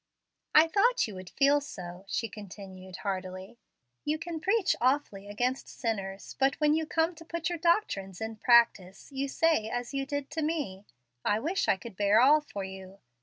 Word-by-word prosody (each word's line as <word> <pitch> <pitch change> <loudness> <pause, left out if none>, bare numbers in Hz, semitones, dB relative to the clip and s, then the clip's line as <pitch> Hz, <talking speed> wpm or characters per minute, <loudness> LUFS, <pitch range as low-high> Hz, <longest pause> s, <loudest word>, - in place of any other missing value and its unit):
"I 315 +2 +8
thought 465 - +3
you 215 - -8
would 185 -1 -9
feel 285 +1 +3
so," 180 -8 -8
she 230 - -1
continued 190 -3 -10
heartily. 190 +3 -4 0.4
"You 300 +1 0
can 335 0 -5
preach 390 +3 +2
awfully 250 -6 +1
against 245 +6 -2
sinners, 200 -5 -4
but 270 0 +3
when 300 -1 +3
you 315 0 0
come 325 +2 +1
to 330 0 -13
put 335 0 -3
your 345 -1 -3
doctrines 305 - +1
in 220 0 -5
practice, 230 -4 +3
you 275 0 -2
say 295 -6 +2
as 245 +3 -4
you 275 0 -2
did 285 -1 -4
to 320 +1 -2
me, 290 - -2 0.4
'I 210 +1 +1
wish 350 +8 0
I 195 - +3
could 220 +1 -10
bear 205 +2 +4
all 290 +5 +6
for 205 -9 -6
you.' 190 0 -9
245 Hz, 180 wpm, -29 LUFS, 195-310 Hz, 0.4 s, I